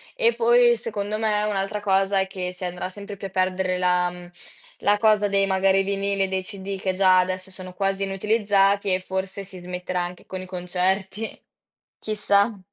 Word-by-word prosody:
E 475 -1 +3
poi, 480 +1 +5
secondo 210 -1 -3
me, 210 -1 +1
un'altra 205 0 -1
cosa 195 -1 +2
è 190 - 0
che 180 -1 -4
si 180 0 -6
andrà 180 +1 -4
sempre 200 +1 -8
più 195 - -5
a - - -13
perdere 185 0 0
la, 180 0 +2
mhmm, 175 0 -11 0.5
la 205 0 +3
cosa 215 -2 +4
dei 195 0 +3
magari 195 0 +3
vinili 200 0 0
e - - 0
dei 190 0 -2
CD 195 0 -6
che 190 -1 -1
già 185 -1 +5
adesso 185 +1 -2
sono 185 -1 -9
quasi 195 +1 -1
inutilizzati 200 -1 +2
e 185 - +1
forse 190 +1 -4
si 185 -2 -10
smetterà 180 0 -3
anche 175 0 -6
con 185 -1 -6
i 185 - -7
concerti, 190 +3 -2 0.6
chissà. 205 0 +1
195 Hz, 185 wpm, -24 LUFS, 185-205 Hz, 0.6 s, poi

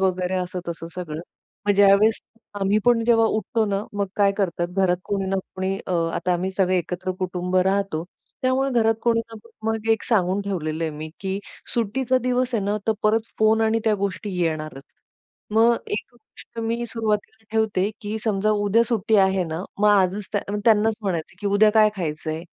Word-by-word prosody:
वगैरे 185 -1 0
असं-तसं 180 -2 -4
सगळं. 165 -4 -5 0.5
मग 205 - +5
ज्यावेळेस 200 +2 +5 0.4
आम्ही 200 +2 +3
पण 240 -1 +4
जेव्हा 225 -1 +4
उठतो 220 +1 0
ना, 200 0 -1
मग 200 -1 -1
काय 200 -1 +4
करतात, 175 -3 -1
घरात 185 -2 +2
कोणी 195 -1 -2
ना 195 - 0 0.2
कोणी 190 +1 -1
अ, 185 - -2 0.2
आता 180 - 0
आम्ही 180 +2 -1
सगळे 185 -1 +3
एकत्र 180 +2 -3
कुटुंब 180 0 -2
राहतो. 190 -3 +1 0.4
त्यामुळे 260 +1 +1
घरात 225 0 +3
कोणी 230 -1 +3
ना 230 0 -11
कोणी 230 -1 -13
मग 225 0 -3
एक 220 - -1
सांगून 195 -4 +1
ठेवलेलं 165 -5 -2
आहे 160 - -1
मी, 155 +1 -7
की 195 0 -2 0.4
सुट्टीचा 250 +3 +1
दिवस 250 0 0
आहे 215 - +1
ना, 205 +1 0
तर 220 - +4
परत 220 +1 +2
फोन 220 +1 +4
आणि 225 0 +2
त्या 220 -2 +3
गोष्टी 200 +1 -2
येणारच. 155 -4 -2 0.7
मग 230 +2 +5
एक 210 - -3
गोष्ट 235 0 -16
मी 230 +1 -1
सुरुवातीला 220 -1 -3
ठेवते 215 -3 +1
की 210 +1 -4
समजा 215 -1 +1
उद्या 215 +3 +4
सुट्टी 220 -2 +2
आहे 190 -1 +1
ना, 165 +1 -4 0.2
मग 210 +1 +4
आजच 200 0 +3
त्या 205 - +1 0.2
त्यांनाच 220 -1 +4
म्हणायचं, 175 -4 -3
की 205 - -3
"उद्या 205 +2 +5
काय 215 0 +5
खायचंय." 160 -2 -3
200 Hz, 180 wpm, -23 LUFS, 185-220 Hz, 0.7 s, मग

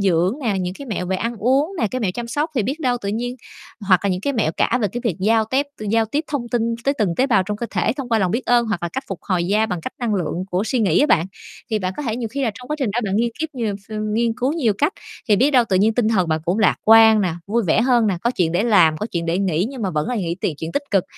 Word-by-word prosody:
dưỡng 185 +1 +2
nè, 210 -6 0
những 180 0 -3
cái 280 - -9
mẹo 200 -6 -3
về 190 +1 -1
ăn 230 +4 -3
uống 270 - +1
nè, 225 - +2
cái 255 - -3
mẹo 205 -5 0
chăm 240 - -4
sóc. 295 +7 -1
Thì 245 - +1
biết 275 +9 -3
đâu 250 -4 +1
tự 200 - -4
nhiên 245 +4 -3 0.5
hoặc 185 -2 +5
là 200 - +2
những 180 0 -1
cái 280 +8 -1
mẹo 215 - 0
cả 245 - +2
về 210 - +2
cái 240 +6 -5
việc 205 -9 0
giao 220 +3 +3
tép 265 +6 0 0.2
giao 225 +1 +3
tiếp 285 +8 -2
thông 265 -5 -3
tin 230 -1 0
tới 275 - +2
từng 195 -6 +1
tế 260 - +3
bào 220 -8 +3
trong 205 +3 -4
cơ 235 - -4
thể - - 0
thông 275 -4 -5
qua 225 -2 +2
lòng 185 -4 +1
biết 235 +7 -2
ơn 240 -1 +3
hoặc 215 -6 -2
là 170 - -1
cách 265 +10 -5
phục 195 - -5
hồi 180 -4 0
da 210 +3 +2
bằng 180 -5 -3
cách - - -6
năng 235 -4 -1
lượng 180 -1 -2
của 180 +2 0
suy 245 +3 -1
nghĩ 190 -7 +3
á 295 - +4
bạn. 170 - +3 0.4
Thì 215 - +1
bạn 185 -1 -2
có - - -4
thể 230 -5 -2
nhiều 235 -2 -3
khi 275 +5 -4
là 230 - +1
trong 250 +4 -12
quá 300 - -2
trình 260 -7 0
đó, 230 +4 -1
bạn 195 -1 -1
nghiên 235 +2 +1
kiếp 320 - -1
nhiều 225 -5 -2
ph 200 +2 -23
ưm, 215 0 -3
nghiên 230 0 +1
cứu 255 +3 0
nhiều 270 -10 +1
cách, 295 +6 +2 0.4
thì 210 - +5
biết 265 +7 +3
đâu 255 -4 +4
tự 190 - +2
nhiên 215 +4 +3
tinh 235 -2 +2
thần 190 -6 +1
bạn 160 0 0
cũng 180 +5 0
lạc 210 -4 +3
quan 220 0 +7
nè, 180 -5 0
vui 230 +4 +1
vẻ 165 - +3
hơn 240 -3 +3
nè, 190 -4 0
có 235 - +2
chuyện 175 -9 0
để 175 +4 +1
làm, 180 -9 +4
có 210 - -3
chuyện 170 -1 -2
để 165 +2 0
nghĩ, 185 -1 0
nhưng 265 -4 -7
mà 190 - -1
vẫn 150 -3 -2
là 250 - -1
nghĩ 175 -5 -2
tiện 160 - -1
chuyện 160 +2 -5
tích 285 - 0
cực, 195 -3 +2
220 Hz, 325 wpm, -21 LUFS, 185-245 Hz, 0.5 s, quan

